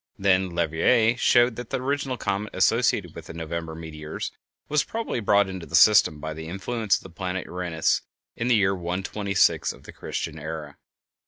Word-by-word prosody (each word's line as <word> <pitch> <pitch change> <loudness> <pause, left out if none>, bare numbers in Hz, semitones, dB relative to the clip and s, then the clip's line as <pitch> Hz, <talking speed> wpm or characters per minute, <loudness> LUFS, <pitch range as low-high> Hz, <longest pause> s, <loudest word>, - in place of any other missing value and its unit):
Then 95 -1 +2
Leverrier 85 +8 +3
showed 120 -1 +4
that 120 -2 -6
the - - -1
original 135 0 -2
comet 100 0 -3
associated 100 -3 +2
with 80 - -10
the - - -9
November 80 0 -5
meteors 80 -1 -6 0.4
was 150 -1 +2
probably 225 - -3
brought 100 -2 +3
into 95 -3 -7
the 80 - -3
system 80 -3 +6
by 80 +1 -5
the 80 +1 -8
influence 105 +4 0
of - - -13
the 95 - -11
planet 90 +1 -4
Uranus 90 -3 0 0.3
in 115 - -2
the 125 - +4
year 100 -2 +3
126 95 +2 0
of - - -15
the - - -11
Christian 80 0 -5
era. 75 -1 -6
95 Hz, 175 wpm, -25 LUFS, 80-110 Hz, 0.4 s, system